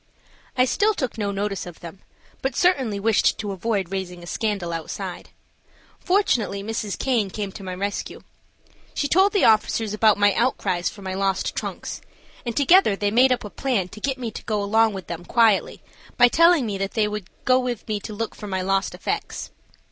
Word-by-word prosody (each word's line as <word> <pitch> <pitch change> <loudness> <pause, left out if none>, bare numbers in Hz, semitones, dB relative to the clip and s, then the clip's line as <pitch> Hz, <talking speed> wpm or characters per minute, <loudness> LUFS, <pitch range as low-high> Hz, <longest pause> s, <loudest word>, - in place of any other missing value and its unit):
I 255 - +5
still 415 - +2
took 260 -8 -3
no 205 -1 -1
notice 200 -1 -3
of 175 - -10
them, 170 +2 -10 0.4
but 265 - -2
certainly 265 - +2
wished 215 +1 +2
to 210 -1 -4
avoid 195 -1 -2
raising 180 -2 -5
a - - -9
scandal 195 -3 -2
outside. 165 -1 -6 0.7
Fortunately 240 - +1
Mrs. 215 -1 -3
Caine 235 -7 0
came 200 0 -4
to 195 - -10
my 185 -1 -5
rescue. 200 +2 -4 0.7
She 285 - 0
told 380 +6 +4
the 400 - +3
officers 220 -1 +2
about 215 0 +4
my 205 -1 +4
outcries 185 -7 0
for 200 - -12
my 190 0 -4
lost 195 0 -1
trunks, - - -5 0.5
and 235 - -3
together 290 - +5
they 205 +1 -1
made 255 +4 +5
up 250 - +1
a 210 - -8
plan 225 -9 -1
to 215 - -11
get 270 +1 -1
me 240 -3 -4
to - - -8
go 210 -3 -1
along 220 +2 +3
with 190 -1 -6
them 170 0 -6
quietly 225 -1 +2 0.3
by 245 0 +7
telling 335 -1 +5
me 200 -3 -3
they 210 +2 0
would 210 -3 -5 0.2
go 255 0 +5
with 250 -3 -4
me 215 -2 -1
to 205 - -8
look 225 +1 -3
for 210 - -9
my 190 -2 -2
lost 195 +1 0
effects. - - -4
210 Hz, 195 wpm, -23 LUFS, 195-245 Hz, 0.7 s, by